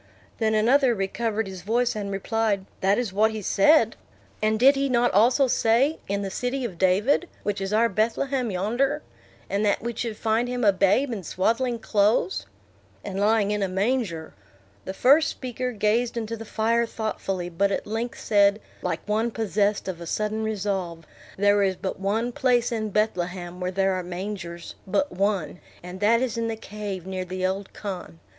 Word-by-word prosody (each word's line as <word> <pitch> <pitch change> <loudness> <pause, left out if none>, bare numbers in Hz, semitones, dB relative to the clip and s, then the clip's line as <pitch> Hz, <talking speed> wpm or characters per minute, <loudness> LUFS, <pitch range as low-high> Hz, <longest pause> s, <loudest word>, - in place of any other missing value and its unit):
Then 220 -1 +2
another 245 +3 +4
recovered 220 +3 -1
his 190 -2 -8
voice, 235 +4 0
and 205 -2 -3
replied, 200 0 -1
"That 195 +2 +2
is 240 -6 -2
what 215 +2 +4
he 220 -1 -5
said." 300 - +4 0.5
"And 215 0 +1
did 270 +4 +6
he 275 0 0
not 245 -1 +3
also 245 +7 +4
say, 250 +5 +2
in 200 +1 -1
the 195 - -4
city 250 +4 -2
of 185 -8 -6
David, 210 - +2
which 205 -1 -2
is 195 0 -3
our 225 +2 +4
Bethlehem 235 +4 0
yonder. 240 +10 0 0.4
And 200 +1 -1
that 205 0 +1
we 235 0 -2
should 225 -1 -4
find 225 +2 +1
him 250 0 -2
a 200 - +6
babe 205 +8 +2
in 205 - -4
swaddling 230 +8 0
clothes?" 215 - +1 0.6
"And 195 -1 -4
lying 210 0 +3
in 210 0 -1
a 195 - +1
manger." 190 -4 -1 0.5
The 190 - -5
first 290 +8 +5
speaker 255 0 -4
gazed 230 +2 0
into 230 0 -3
the 225 0 -8
fire 230 +2 +1
thoughtfully, 195 -5 -3
but 195 +4 +1
at - - -2
length 225 +3 -4
said, 205 0 +3 0.2
like - - -3
one 220 +3 +1
possessed 210 -2 0
of 175 -3 -5
a 170 - -7
sudden 215 +4 -1
resolve, 195 -6 -3 0.3
"There 205 +1 +4
is 190 -1 +2
but 190 +1 -5
one 220 +5 0
place 250 -3 +1
in 215 -2 -2
Bethlehem 180 -4 -2
where 180 0 -2
there 195 +1 +1
are 185 - -1
mangers; 175 -1 -6
but 285 +10 0
one, 185 -4 -1 0.2
and 180 +1 -8
that 230 +4 +3
is 240 -2 -2
in 230 - -1
the 225 - -2
cave 205 -4 -6
near 185 -1 -3
the 185 +1 -3
old 190 +1 -2
khan. 190 -5 -6
210 Hz, 180 wpm, -25 LUFS, 195-235 Hz, 0.6 s, did